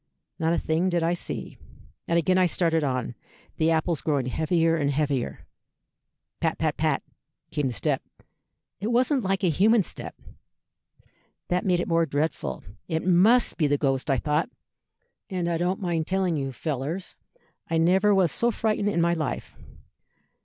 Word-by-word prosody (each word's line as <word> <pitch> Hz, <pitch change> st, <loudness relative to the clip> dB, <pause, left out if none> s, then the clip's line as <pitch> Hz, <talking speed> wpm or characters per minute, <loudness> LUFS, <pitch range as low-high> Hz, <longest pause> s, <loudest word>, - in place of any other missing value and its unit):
Not 160 Hz, +1 st, +1 dB
a -, -, +1 dB
thing 165 Hz, +4 st, 0 dB
did 175 Hz, -2 st, 0 dB
I 170 Hz, +1 st, +2 dB
see. 175 Hz, -, -5 dB, 0.5 s
And 170 Hz, -, +2 dB
again 185 Hz, +2 st, +3 dB
I 185 Hz, -, +4 dB
started 165 Hz, -2 st, +1 dB
on, 130 Hz, -3 st, -1 dB, 0.4 s
the 160 Hz, 0 st, +2 dB
apples 165 Hz, 0 st, +1 dB
growing 145 Hz, -5 st, 0 dB
heavier 165 Hz, +5 st, +1 dB
and 145 Hz, -3 st, 0 dB
heavier. 140 Hz, -3 st, -1 dB, 0.9 s
Pat, -, -, 0 dB
pat, -, -, 0 dB
pat, -, -, 0 dB, 0.5 s
came 145 Hz, -3 st, 0 dB
the 125 Hz, -, -3 dB
step. 95 Hz, -, 0 dB, 0.8 s
It 205 Hz, -, -3 dB
wasn't 255 Hz, +4 st, +2 dB
like 195 Hz, -1 st, -1 dB
a 180 Hz, -, +4 dB
human 210 Hz, +6 st, +4 dB
step. -, -, -8 dB, 1.3 s
That 180 Hz, +2 st, 0 dB
made 180 Hz, -2 st, +3 dB
it -, -, -2 dB
more 165 Hz, -1 st, +2 dB
dreadful. 145 Hz, -, -2 dB, 0.2 s
'It 160 Hz, -1 st, -2 dB
must 200 Hz, +7 st, +4 dB
be 155 Hz, -, +2 dB
the 145 Hz, 0 st, +2 dB
ghost,' 135 Hz, 0 st, -1 dB
I 135 Hz, -, +3 dB
thought; 150 Hz, -, 0 dB, 0.8 s
and 180 Hz, -3 st, -2 dB
I 170 Hz, -1 st, 0 dB
don't 180 Hz, +2 st, 0 dB
mind 170 Hz, -4 st, -1 dB
telling 185 Hz, -3 st, +1 dB
you, 135 Hz, -2 st, -2 dB
fellers, 150 Hz, +6 st, -4 dB, 0.5 s
I 165 Hz, -, +1 dB
never 190 Hz, +5 st, +4 dB
was 185 Hz, -5 st, +3 dB
so 235 Hz, -, +1 dB
frightened 215 Hz, -2 st, 0 dB
in 170 Hz, -4 st, +1 dB
my 170 Hz, 0 st, +3 dB
life. 160 Hz, -3 st, -4 dB
165 Hz, 165 wpm, -26 LUFS, 150-185 Hz, 1.3 s, I